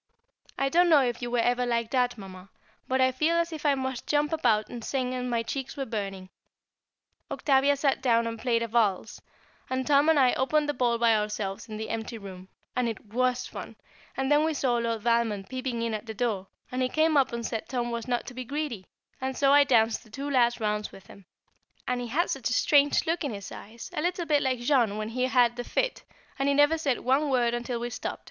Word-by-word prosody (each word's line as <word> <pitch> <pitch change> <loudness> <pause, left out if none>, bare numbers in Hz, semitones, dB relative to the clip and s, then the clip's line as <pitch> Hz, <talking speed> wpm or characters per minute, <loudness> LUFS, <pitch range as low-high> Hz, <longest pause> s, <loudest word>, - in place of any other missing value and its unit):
I 275 0 +1
don't 350 +4 +4
know 300 -4 +6
if 240 -1 -2
you 240 - -3
were 245 - 0
ever 245 +1 +2
like 235 -2 -1
that, 250 -2 +1
Mamma, 190 -1 -11 0.4
but 260 +1 0
I 260 0 +4
felt 310 +6 +1
as 335 0 -4
if 310 -1 -3
I 285 - +4
must 260 -2 -4
jump 295 +1 +1
about 215 -9 +2
and 240 -2 -8
sing, 255 0 -2
and 250 0 -3
my 235 -1 0
cheeks 270 +4 -5
were 270 - -2
burning. 195 -5 -5 1.0
Octavia 280 0 +2
sat 275 -1 +1
down 235 -3 +3
and 230 -1 -4
played 235 -1 +1
a - - -2
valse, 215 -3 0 0.5
and 260 0 -1
Tom 290 +1 +4
and 320 - +4
I 255 -2 +4
opened 295 +3 +1
the 290 - 0
ball 240 -2 +1
by 230 -1 +4
ourselves 210 0 -3
in 215 - -6
the 220 - -5
empty 225 +1 -4
room, 190 -2 -10 0.3
and 250 -2 +1
it 215 -1 -9
was 250 0 +1
fun, - - -8 0.4
and 270 +1 -1
then 295 +1 +5
we 315 -1 0
saw 255 -4 +1
Lord 230 -2 -2
Valmond 230 -4 0
peeping 255 -2 -3
in 230 -1 -1
at 215 +2 -5
the 220 - -6
door, 210 -6 -1 0.2
and 255 +1 -2
he 255 - +1
came 310 +3 +2
up 270 -2 +3
and 235 -1 -4
said 225 -1 -4
Tom 240 -2 -2
was 235 0 -4
not 245 -1 -1
to - - -8
be 255 +1 -5
greedy, 265 -6 -4 0.3
and 265 0 -3
so 275 0 +4
I 290 0 +7
danced 230 -5 +2
the 220 - -19
two 275 +6 -6
last 240 -2 +3
rounds 210 -1 -2
with 195 - -14
him, 200 - -15 0.6
and 250 0 -1
he 245 - -4
had 310 +9 0
such 265 -4 -2
a - - 0
strange 290 +2 +3
look 330 +1 -1
in 270 -7 -3
his 200 -1 -8
eyes, 230 +3 -10
a - - -2
little 350 +1 -1
bit 295 -2 +2
like 255 -2 -1
Jean 240 -5 +2
when 215 0 -3
he 250 +2 -1
had 245 -2 +3
the 245 - -3
fit, - - -2 0.4
and 275 +1 +2
he 280 - +2
never 290 +3 +4
said 275 -5 0
one 275 +4 +2
word 240 -3 +2
until 240 0 -3
we 240 +1 -4
stopped. - - -5
245 Hz, 235 wpm, -27 LUFS, 230-275 Hz, 1.0 s, I